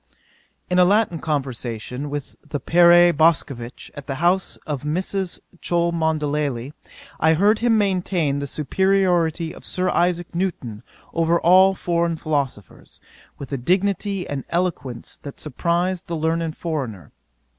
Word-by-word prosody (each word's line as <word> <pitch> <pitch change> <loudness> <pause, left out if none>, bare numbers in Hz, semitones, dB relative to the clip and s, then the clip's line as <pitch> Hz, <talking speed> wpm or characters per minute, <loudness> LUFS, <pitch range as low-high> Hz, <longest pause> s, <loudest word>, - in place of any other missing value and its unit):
'In 180 0 +2
a - - +7
Latin 195 -2 +2
conversation 130 -2 -3
with 145 -1 -6
the 150 -1 -4
Père 175 +1 +6
Boscovitch, 140 -6 0
at 145 -2 -10
the 135 - -3
house 175 +5 +1
of 145 -4 -3
Mrs. 185 +4 -2 0.2
Cholmondeley, 150 -6 -1 0.5
I 160 +1 +4
heard 205 +6 +3
him 235 -1 +3
maintain 180 -7 0
the 140 - -4
superiority 175 +1 +1
of - - -13
Sir 185 0 -1
Isaac 175 0 0
Newton 170 - -3 0.3
over 165 +1 +2
all 190 +2 +5
foreign 170 -2 0
philosophers, 140 - -4 0.4
with 140 -1 -8
a - - 0
dignity 195 - 0
and 140 -2 -4
eloquence 165 -9 -3
that 140 - -10
surprized 170 +5 -1
that 170 - -3
learned 160 0 -1
foreigner. 125 - -4
165 Hz, 130 wpm, -22 LUFS, 145-180 Hz, 0.5 s, a